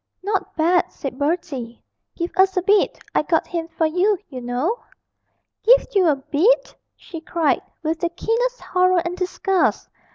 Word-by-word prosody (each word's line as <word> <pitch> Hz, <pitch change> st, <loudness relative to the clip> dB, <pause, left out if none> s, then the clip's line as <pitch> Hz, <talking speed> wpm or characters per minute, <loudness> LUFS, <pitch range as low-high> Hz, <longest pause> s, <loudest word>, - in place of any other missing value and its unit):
'Not 400 Hz, 0 st, -2 dB
bad,' 345 Hz, +2 st, +2 dB
said 265 Hz, -2 st, -7 dB
Bertie; 285 Hz, -6 st, -2 dB, 0.4 s
'give 340 Hz, 0 st, -3 dB
us 380 Hz, 0 st, +3 dB
a 365 Hz, -, +2 dB
bit 410 Hz, +1 st, +3 dB, 0.2 s
I -, -, +3 dB
got 320 Hz, +1 st, +1 dB
him 335 Hz, -2 st, -4 dB
for 325 Hz, 0 st, -1 dB
you, 365 Hz, +6 st, +2 dB
you 255 Hz, -3 st, -7 dB
know.' 255 Hz, -, -1 dB, 0.8 s
'Give -, -, +5 dB
you 380 Hz, -3 st, +4 dB
a 300 Hz, -, +4 dB
bit!' 330 Hz, -, +1 dB, 0.2 s
she 330 Hz, -3 st, -10 dB
cried, 330 Hz, -1 st, 0 dB, 0.2 s
with 320 Hz, +1 st, -1 dB
the 345 Hz, -, 0 dB
keenest 480 Hz, +8 st, -1 dB
horror 365 Hz, -1 st, +2 dB
and 345 Hz, +1 st, -3 dB
disgust. 375 Hz, +1 st, 0 dB
345 Hz, 160 wpm, -21 LUFS, 315-385 Hz, 0.8 s, Give